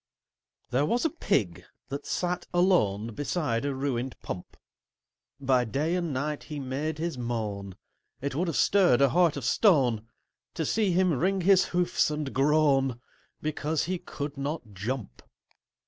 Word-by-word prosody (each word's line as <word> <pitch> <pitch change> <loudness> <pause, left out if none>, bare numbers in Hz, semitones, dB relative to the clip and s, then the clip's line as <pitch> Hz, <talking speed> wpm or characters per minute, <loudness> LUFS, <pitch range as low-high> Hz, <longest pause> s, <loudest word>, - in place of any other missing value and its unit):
There 140 +4 +2
was 240 - +1
a 325 - +2
Pig 130 - 0 0.3
that 140 +2 -5
sat 180 0 -2
alone 115 - +2
Beside 145 -3 -1
a 140 -1 -1
ruined 130 -2 -2
Pump: 90 - -7 0.8
By 130 -2 +3
day 140 +9 -1
and 175 -3 -1
night 145 +3 -3
he 150 -2 -6
made 140 +4 -3
his 165 -4 -3
moan— 105 -5 -3 0.4
It 140 +1 -3
would 175 +6 0
have 165 - -1
stirred 185 -11 +4
a 140 - +6
heart 170 0 +3
of 135 - -4
stone 125 - +3 0.5
To 160 - -1
see 210 +4 +1
him 180 0 +3
wring 185 +7 +1
his 190 +1 +5
hoofs 175 -3 +1
and 150 -2 -3
groan, 135 -3 +3 0.4
Because 155 0 -1
he 180 +1 -2
could 145 -2 -6
not 140 -6 -4
jump. 105 - -5
145 Hz, 150 wpm, -28 LUFS, 125-170 Hz, 0.8 s, a